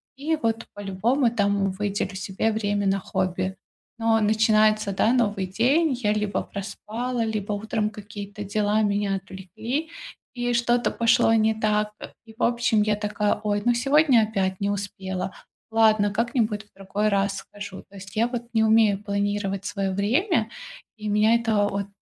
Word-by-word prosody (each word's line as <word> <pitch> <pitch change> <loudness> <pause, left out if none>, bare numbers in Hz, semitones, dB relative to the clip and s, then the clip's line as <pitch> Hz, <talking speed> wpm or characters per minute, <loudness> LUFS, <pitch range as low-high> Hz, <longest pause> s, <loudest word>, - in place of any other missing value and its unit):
и, 305 +4 -1
вот, 225 -1 -1
по-любому, 215 +7 +1
там, 200 -3 +1
выделю 200 0 -3
себе 195 +3 -1
время 205 -2 -1
на 195 0 +2
хобби. 185 0 -2 0.4
Но 225 0 +3
начинается, 215 -1 +3
да, 205 +4 +2
новый 205 -6 +1
день. 265 - +2
Я 215 -4 0
либо 210 -1 -1
проспала, 230 +4 -4
либо 215 -2 -2
утром 210 +1 -1
какие-то 205 -1 -8
дела 210 +1 +1
меня 205 -1 0
отвлекли, 200 - -5 0.5
и 245 0 -1
что-то 240 +1 +2
пошло 230 -1 +3
не 220 0 +3
так. 210 -1 0 0.3
И, 225 - -14
в - - -2
общем, 235 -3 +2
я 210 0 +1
такая: 210 0 0
ой, 205 -1 0
ну 240 - +4
сегодня 275 0 +4
опять 190 -3 -1
не 200 - +1
успела. 190 -2 -4 0.4
Ладно, 215 -2 +4
как-нибудь 225 -2 0
в 210 - -34
другой 195 +2 -1
раз 200 -1 +1
схожу. 205 -1 -9
То 200 - -17
есть 195 +2 -11
я 230 +2 +2
вот 240 -1 -4
не 220 -1 +3
умею 220 -2 +4
планировать 200 -1 -2
своё 195 -2 -2
время, 230 - +1 0.5
и 215 -1 -5
меня 215 +2 +4
это 220 -3 +2
от 200 0 -3
210 Hz, 160 wpm, -24 LUFS, 200-225 Hz, 0.5 s, ну